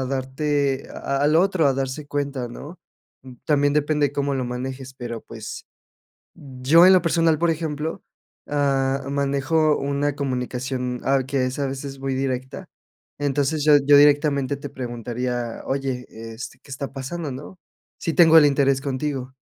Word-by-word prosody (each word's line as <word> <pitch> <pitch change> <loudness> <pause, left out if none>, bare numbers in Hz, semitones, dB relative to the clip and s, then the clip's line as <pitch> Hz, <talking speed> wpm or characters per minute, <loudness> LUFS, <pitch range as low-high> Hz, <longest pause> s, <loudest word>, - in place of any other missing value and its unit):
a 130 - -2
darte 135 +1 -1
a 140 0 -3
al 150 +3 +3
otro, 180 -4 +3
a - - +3
darse 135 +2 -4
cuenta, 140 -4 -3
¿no?, 150 +8 -10 0.6
también 145 -1 +2
depende 150 -1 +2
de 140 - -14
cómo 140 -1 -1
lo 130 - -1
manejes, 130 +2 -6
pero, 120 -3 -6
pues, 110 -1 -9 0.7
yo 140 +5 +3
en 190 - +8
lo 185 - +5
personal, 165 -1 +2
por 170 0 +2
ejemplo, 160 0 -3 0.5
ah, 135 -2 0
manejo 140 +2 +1
una 140 +1 -1
comunicación, 125 -2 -3
ah, 135 -1 +2
que 135 -1 0
es 130 +3 -4
a 140 - 0
veces 135 0 -6
muy 135 -1 -2
directa. 130 -1 -4 0.5
Entonces, 145 +1 0
yo 150 - +6
yo 145 0 +7
directamente 145 -1 +3
te 145 0 -7
preguntaría: 120 -1 -4
"Oye, 135 -2 -2 0.3
este, 115 +4 -9
¿qué 140 - -15
está 135 +1 -5
pasando, 145 +4 -5
no?", 150 +7 -9 0.4
sí 165 - -2
tengo 165 -1 +7
el 150 - +8
interés 140 -1 +2
contigo. 135 -2 -3
140 Hz, 155 wpm, -23 LUFS, 130-145 Hz, 0.7 s, en